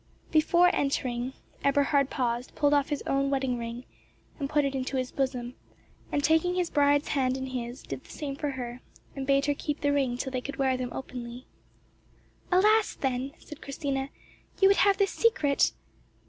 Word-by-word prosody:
Before 345 +3 +4
entering, 255 -2 -1 0.3
Eberhard 280 0 +3
paused, 245 -1 -2
pulled 290 -1 +3
off 285 -1 +2
his 290 -2 -2
own 275 0 +1
wedding 265 -3 0
ring, 235 +2 -6 0.5
and 275 -2 -2
put 295 -1 +2
it 275 - -1
into 265 0 -2
his 255 -1 -2
bosom, 255 -3 -2 0.6
and 285 - 0
taking 320 +4 +3
his 360 -2 0
bride's 285 0 +3
hand 260 -2 +1
in 265 - -4
his, 250 -1 -5
did - - -6
the - - -19
same 285 -3 -5
for 295 0 -2
her, 250 -2 -5 0.3
and 270 -1 -4
bade 275 0 +3
her 290 - +2
keep 295 +1 -4
the 285 -1 +2
ring 265 -4 +1
till 265 +1 -3
they 255 -1 -2
could 280 - -6
wear 265 -1 +2
them 255 -1 -3
openly. 245 -1 -7 1.1
"Alas! 425 +4 +4
then," 265 +1 -2
said 300 - -12
Christina, 275 -1 -3 0.5
"you 385 - +7
would 395 - +4
have 400 0 +4
this 395 -1 +2
secret?" 300 -12 +2
275 Hz, 180 wpm, -28 LUFS, 255-290 Hz, 1.1 s, you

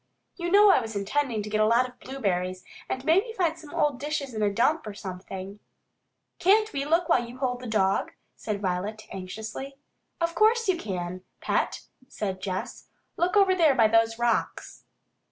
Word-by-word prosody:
You 345 -1 -3
know 405 +2 +7
I - - +4
was 225 -1 -6
intending 220 +2 -1
to 210 - -6
get 215 0 +2
a 215 - +4
lot 235 +3 +3
of 250 -1 -17
blueberries, 185 -8 -2 0.3
and 260 +1 -3
maybe 390 +8 +3
find 335 -3 +1
some 320 -3 -13
old 290 -3 0
dishes 285 -2 -3
in 215 - -3
a 205 -1 +2
dump 245 +6 +1
or 205 - -6
something 190 +1 -7 0.4
" - - -52
"Can't 430 +4 +3
we 275 0 -2
look 330 +3 +2
while 240 - +3
you 240 +1 -9
hold 250 -2 -1
the 250 - -8
dog?" 195 -3 +1 0.2
asked 215 -2 -3
Violet 200 +3 -2
anxiously. 220 +8 -6 0.4
"Of 335 0 0
course 445 +5 +3
you 375 - +3
can, 185 - -5 0.2
Pet!" - - -1 0.3
said 195 -8 -4
Jess. 185 -1 -5 0.3
"Look 360 +4 +1
over 390 -2 +5
there 325 -6 +4
by 225 -3 +5
those 225 +1 +3
rocks." 240 0 -1
240 Hz, 185 wpm, -27 LUFS, 205-320 Hz, 0.4 s, know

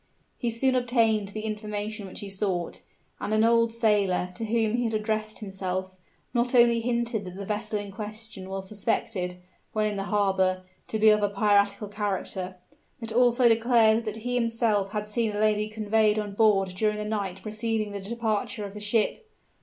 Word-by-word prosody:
He 240 - 0
soon 255 +3 +1
obtained 230 -4 +2
the 215 +2 -5
information 210 -1 -4
which 185 - -7
he 205 - -6
sought; 190 -3 -2 0.4
and 215 - -1
an 215 - +4
old 230 0 +4
sailor, 205 -6 +2
to 225 +5 -4
whom 225 0 +1
he 245 - 0
had 225 -1 -1
addressed 215 0 -2
himself, 190 -2 -4 0.4
not 245 +1 +1
only 235 -1 +5
hinted 235 -2 -1
that 180 -1 -8
the 200 +1 -6
vessel 210 +1 -2
in 205 -1 -5
question 215 -1 -7
was 190 0 -5
suspected, 195 -3 -2 0.4
when 215 -1 +1
in 210 -1 -1
the 195 - -2
harbor, 190 -3 +1 0.2
to 220 - -2
be 220 0 +6
of 210 - +4 0.2
piratical 200 0 +2
character, 195 -2 -3 0.4
but 230 -2 -5
also 245 +1 +4
declared 230 -1 +4
that 215 0 -3
he 245 - -1
himself 230 -4 +1
had 210 -1 -2
seen 210 0 -1
a - - -2
lady 215 0 +2
conveyed 215 0 +2
on 210 -2 -3
board 200 -2 +3
during 210 +3 0
the 210 - -3
night 200 -3 -3
preceding 215 0 -1
the 200 -1 -5
departure 215 0 -2
of 200 - -8
the 210 - -7
ship. 225 - 0
215 Hz, 180 wpm, -27 LUFS, 200-225 Hz, 0.4 s, be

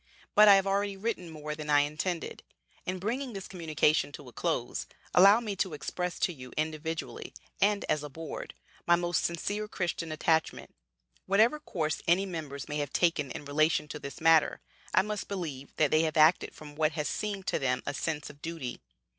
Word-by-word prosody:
"But 210 0 +8
I 200 - +10
have 195 0 +3
already 200 0 0
written 195 -4 -3
more 150 -1 -5
than 150 0 -7
I 145 -1 +6
intended. 155 +4 -3 0.5
In 185 +1 -1
bringing 240 +7 -3
this 195 -2 -6
communication 160 -5 +1
to 145 - -10
a - - -18
close, - - -2 0.3
allow 200 +4 +8
me 215 -4 -4
to 185 -4 -1
express 180 +4 -3
to 175 - +2
you 125 -4 -11
individually, 160 +1 -3 0.3
and 205 0 +3
as 150 - +1
a 150 - -6
Board, 160 - -7 0.3
my 175 - +7
most 175 -1 0
sincere 205 +5 -2
Christian 175 -5 -3
attachment. 160 +1 0 0.5
Whatever 220 +9 +4
course 160 - -2
any 180 +4 +4
members 155 -7 -6
may 150 - -3
have 145 -2 -2
taken 165 -5 +1
in 145 - -7
relation 150 +1 +2
to 150 - -6
this 140 +2 -8
matter, 160 -1 +4 0.3
I - - +4
must 210 0 -4
believe 155 -9 -5
that 150 -3 +2
they 155 - +5
have 160 -2 -1
acted 155 +3 +4
from 150 -1 -11
what 155 0 +1
has 150 -1 -2
seemed 200 -3 -3
to - - 0
them 125 -2 0
a 145 - -2
sense 150 +1 -3
of 145 0 -22
duty. 160 -7 -5
165 Hz, 190 wpm, -30 LUFS, 150-195 Hz, 0.5 s, I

